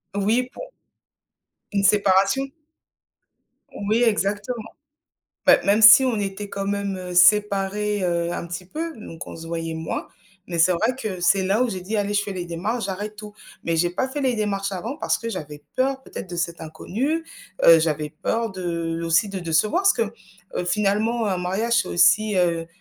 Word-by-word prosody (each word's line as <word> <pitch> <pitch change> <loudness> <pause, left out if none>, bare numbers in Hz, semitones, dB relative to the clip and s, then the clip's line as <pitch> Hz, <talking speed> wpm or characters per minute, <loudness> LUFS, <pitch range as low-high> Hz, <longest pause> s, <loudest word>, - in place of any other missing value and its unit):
Oui 225 +6 +1
pour - - -9 1.0
Une 200 -1 0
séparation? 195 +6 +3 1.4
Oui 230 +3 +3
exactement. 210 +1 -1 0.8
Beh, - - +7
même 205 +2 +3
si 225 +5 +10
on 240 -4 0
était 200 0 -4
quand 195 0 -4
même, 200 -1 -2
heu, 180 -1 -7
séparés, 205 +2 +3
heu, 170 -1 0
un 170 - -4
petit 175 +1 -6
peu 320 - -5
donc 170 -5 -9
on - - -9
se 165 0 -9
voyait 165 -1 -4
moins 160 0 -4 0.4
mais 170 -1 -4
c'est 170 +3 +5
vrai 220 +9 0
que 195 -7 -4
c'est 190 +2 +3
là 200 +6 +2
où 245 - 0
j'ai 185 - -4
dit: 210 +5 -3
«Allez, 205 0 -1
je 205 - +2
fais 200 -1 -6
les 180 - -4
démarches, 195 +8 -3
j'arrête 205 +2 -5
tout». 210 0 -10 0.3
Mais 165 0 0
j'ai 175 +2 +2
pas 260 +10 -2
fait 290 +2 -4
les 255 -3 +1
démarches 200 -2 -2
avant 225 - -5
parce - - 0
que 230 - -5
j'avais 150 -6 -7
peur 265 +1 0
peut-être 190 - -8
de 175 - -6
cet 170 0 -3
inconnu, 240 - -3 0.4
heu, 165 -1 +9
j'avais 155 -2 -1
peur 225 +8 -2
de 170 -3 -3
aussi 165 +5 +2
de 195 - -4
décevoir 175 - +1
parce 390 - +5
que, 235 - 0 0.5
heu, - - -2
finalement 210 +4 +1
un 190 -2 -1
mariage 215 +7 +1
c'est - - -9
aussi, 195 +4 +3
heu, 170 -2 +1
200 Hz, 185 wpm, -23 LUFS, 175-220 Hz, 1.4 s, si